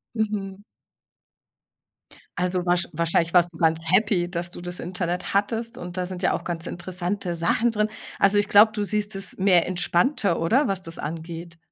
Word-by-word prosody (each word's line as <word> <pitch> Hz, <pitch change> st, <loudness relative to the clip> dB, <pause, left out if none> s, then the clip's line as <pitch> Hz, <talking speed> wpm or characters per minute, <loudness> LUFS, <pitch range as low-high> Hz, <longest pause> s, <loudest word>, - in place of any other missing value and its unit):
Mhm. 205 Hz, -2 st, -3 dB, 1.8 s
Also, 180 Hz, 0 st, 0 dB
wahrsch 175 Hz, 0 st, +2 dB
wahrscheinlich 165 Hz, +1 st, +1 dB
warst 175 Hz, 0 st, +4 dB
du 160 Hz, -, -13 dB
ganz 165 Hz, 0 st, +2 dB
happy, 190 Hz, -3 st, +2 dB
dass 175 Hz, 0 st, -3 dB
du 175 Hz, -, -9 dB
das 175 Hz, 0 st, -5 dB
Internet 180 Hz, +1 st, -3 dB
hattest 225 Hz, +3 st, 0 dB
und 175 Hz, +1 st, -7 dB
da 180 Hz, -, -1 dB
sind 185 Hz, 0 st, -6 dB
ja -, -, +3 dB
auch -, -, -3 dB
ganz 170 Hz, -2 st, -4 dB
interessante 180 Hz, +1 st, -3 dB
Sachen 195 Hz, +8 st, +2 dB
drin. 210 Hz, -1 st, 0 dB, 0.3 s
Also, 200 Hz, +1 st, +4 dB
ich 205 Hz, 0 st, +1 dB
glaube, 215 Hz, +2 st, +7 dB
du 210 Hz, -3 st, -2 dB
siehst 210 Hz, 0 st, -1 dB
es 195 Hz, -2 st, -4 dB
mehr 185 Hz, -3 st, +4 dB
entspannter, 180 Hz, -, +1 dB
oder, 250 Hz, -, +3 dB
was 195 Hz, -4 st, -1 dB
das 165 Hz, -2 st, -6 dB
angeht? 165 Hz, +2 st, -6 dB
180 Hz, 175 wpm, -24 LUFS, 175-205 Hz, 1.8 s, glaube